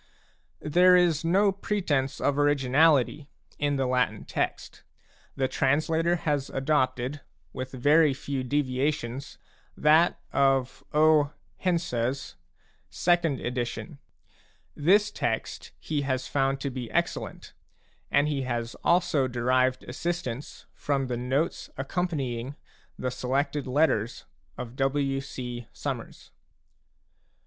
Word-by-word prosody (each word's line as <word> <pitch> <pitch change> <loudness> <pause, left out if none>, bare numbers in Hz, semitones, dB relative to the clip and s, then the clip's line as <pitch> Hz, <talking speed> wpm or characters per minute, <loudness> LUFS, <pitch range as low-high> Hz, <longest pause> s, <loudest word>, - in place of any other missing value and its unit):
There 180 +4 +5
is 175 -3 +3
no 195 +5 +3
pretence 160 -9 -1
of 145 0 +1
originality 145 0 +3 0.3
in 145 -1 +1
the 135 -1 0
Latin 125 -4 0
text; - - -3 0.5
the 135 -1 +1
translator 160 +6 +1
has 145 -5 -1
adopted, 135 -1 0 0.3
with 130 0 -5
very 145 +4 +4
few 140 -1 -3
deviations, 135 -1 -2 0.4
that 155 +3 +4
of 135 -2 +2
O. 150 -1 +4 0.2
Hense's 140 -8 -1 0.5
second 170 -6 +1
edition. 125 +5 -4 0.8
This 205 +7 +3
text - - -3
he 150 -2 -2
has 130 -2 -2
found 135 -1 0
to 140 - -2
be 125 -3 -5
excellent, - - -3 0.6
and 145 +1 +3
he 145 -2 -1
has 120 -2 -3
also 170 -6 +3
derived 130 +1 +1
assistance 145 -2 -4
from 140 -2 -1
the 120 - -1
notes 130 +7 -1
accompanying 135 -4 -2 0.4
the 125 - -2
Selected 135 +3 -1
Letters 130 -5 +1 0.3
of 120 0 -7
W. 135 0 0
C. 125 -3 -7
Summers. - - -6
140 Hz, 105 wpm, -27 LUFS, 130-155 Hz, 0.8 s, There